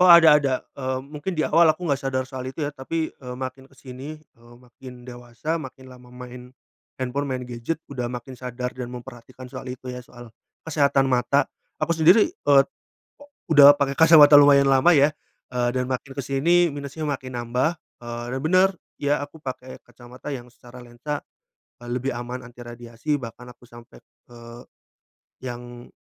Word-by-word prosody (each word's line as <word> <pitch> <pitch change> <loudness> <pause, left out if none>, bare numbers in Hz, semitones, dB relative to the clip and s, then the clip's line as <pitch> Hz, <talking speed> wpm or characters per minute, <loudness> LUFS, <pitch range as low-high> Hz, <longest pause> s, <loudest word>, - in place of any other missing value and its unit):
Oh - - +6
ada 160 -3 +9
ada. 140 -3 +1 0.2
Eee, 130 -1 -2
mungkin 150 +6 -6
di 160 - -2
awal 160 0 +4
aku 175 +2 -6
nggak 140 -2 +1
sadar 130 -2 -1
soal 130 -1 -6
itu 130 +5 -7
ya 145 - -1
tapi, 155 +3 -3
eee, 125 -2 -8
makin 130 0 -6
ke 135 - -22
sini, 135 +4 -9 0.2
eee, 120 +1 -18
makin 125 0 -13
dewasa 120 +6 -5
makin 130 -4 -9
lama 125 -1 -15
main, 125 0 -11 0.5
handphone 130 +3 -2
main 130 -1 -3
gadget 120 +7 -4
udah 130 -3 -4
makin 125 +1 -7
sadar 125 0 -5
dan 125 -1 -6
memperhatikan 125 0 -11
soal 130 - -8
itu 125 0 -8
ya 125 0 -7
soal 120 -1 -13 0.4
kesehatan 140 -3 +2
mata. 130 +2 +2 0.3
Aku 170 +2 0
sendiri, 175 +7 +6
eee, 140 -1 +4 0.9
udah 145 -1 +10
pakai 140 -1 0
kacamata 160 -2 +8
lumayan 140 -1 +7
lama 135 +4 +5
ya, 145 +2 +4 0.4
eee, 120 -1 +1
dan 125 - 0
makin 130 +1 -4
ke - - -1
sini 170 +6 +3
minusnya 145 +2 -6
makin 130 -3 -4
nambah, 125 +8 -1 0.2
eee, 120 0 -6
dan 130 - -2
bener 185 +5 +4 0.3
ya 145 0 0
aku 145 +3 -8
pakai 130 -2 -7
kacamata 125 +3 -10
yang 125 -2 -8
secara 120 +1 -14
lensa, 120 +5 -6 0.6
eee, 120 - -12
lebih 130 +2 -2
aman 120 +1 -6
anti 120 0 -15
radiasi 120 +4 -4
bahkan 120 0 -9
aku 120 - -21
sampai, 120 0 -15 0.3
eee, 120 0 -12 0.8
yang 120 -1 -8
130 Hz, 175 wpm, -23 LUFS, 125-145 Hz, 0.9 s, udah